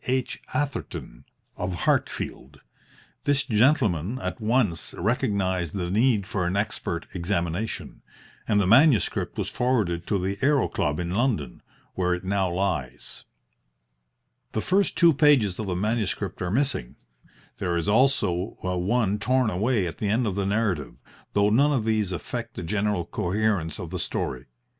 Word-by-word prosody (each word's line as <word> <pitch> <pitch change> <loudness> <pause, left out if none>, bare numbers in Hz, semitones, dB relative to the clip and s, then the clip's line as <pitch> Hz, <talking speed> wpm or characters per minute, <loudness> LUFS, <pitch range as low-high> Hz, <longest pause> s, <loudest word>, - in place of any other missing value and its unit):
H. 130 0 -1
Atherton, 125 - -4 0.3
of 90 -1 -3
Hartfield. 70 +2 -1 0.6
This 145 0 +3
gentleman 110 - +2
at 130 - -5
once 110 -6 0
recognised 100 - 0
the 90 -2 -2
need 110 -1 +3
for 95 -2 -1
an 95 +3 -1
expert 100 -5 -2
examination, 90 +2 -2 0.5
and 105 -2 +3
the 100 - +2
manuscript 120 - +4
was - - -1
forwarded 105 -9 0
to 100 - +1
the 95 +2 -2
Aero 140 -2 +3
Club 75 -1 -1
in 85 0 -3
London, 95 - -1 0.3
where 90 -1 +1
it 90 - -8
now 95 -1 0
lies. 85 -9 -3 1.3
The 110 - 0
first 195 - +1
two 170 -2 +6
pages 135 - +4
of 110 - -3
the 90 - -1
manuscript 105 +1 -1
are 90 - -1
missing. 130 - -1 0.6
There 85 -1 0
is 85 - -2
also 105 -5 +2
one 95 +4 0
torn 125 0 +2
away 105 +2 +1
at 85 - -6
the 105 - -1
end 115 +4 +2
of 105 - -1
the 100 0 -1
narrative, 100 - -1 0.4
though 100 +1 +3
none 140 +7 +4
of 125 -6 0
these 110 -4 +1
affect 115 +5 -5
the - - -5
general 100 0 0
coherence 100 -3 -1
of 85 - -7
the 90 - -3
story. 65 -5 -3
100 Hz, 150 wpm, -25 LUFS, 90-120 Hz, 1.3 s, two